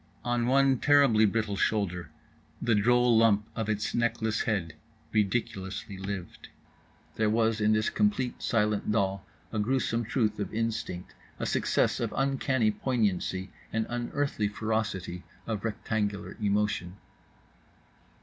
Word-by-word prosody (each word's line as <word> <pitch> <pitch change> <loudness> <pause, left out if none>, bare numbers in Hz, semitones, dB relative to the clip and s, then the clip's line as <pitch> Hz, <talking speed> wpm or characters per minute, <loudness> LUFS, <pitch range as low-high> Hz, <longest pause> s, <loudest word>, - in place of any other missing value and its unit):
On 120 -1 +1
one 135 0 +4
terribly 140 -7 +5
brittle 105 -1 -1
shoulder 90 -6 0 0.5
the 120 -1 +1
droll 120 +3 +4
lump 110 -2 +4
of 110 -1 -2
its 105 0 -1
neckless 110 -2 0
head 95 -8 -1 0.4
ridiculously 100 -3 -1
lived. 95 -2 -6 0.7
There 110 -1 +2
was 110 0 +2
in 105 +1 +4
this 110 0 +1
complete 170 -13 0
silent 105 -3 +1
doll 100 -2 0 0.3
a 110 - -2
gruesome 120 +1 0
truth 110 -3 0
of 100 - -3
instinct, 110 -5 -3 0.2
a - - -3
success - - +1
of - - -1
uncanny 135 -4 +2
poignancy, 100 -6 -1 0.2
an 110 0 0
unearthly 120 -1 -1
ferocity 105 -4 -2 0.2
of 110 -3 -3
rectangular 105 -2 -2
emotion. 100 -3 0
110 Hz, 120 wpm, -29 LUFS, 100-120 Hz, 0.7 s, terribly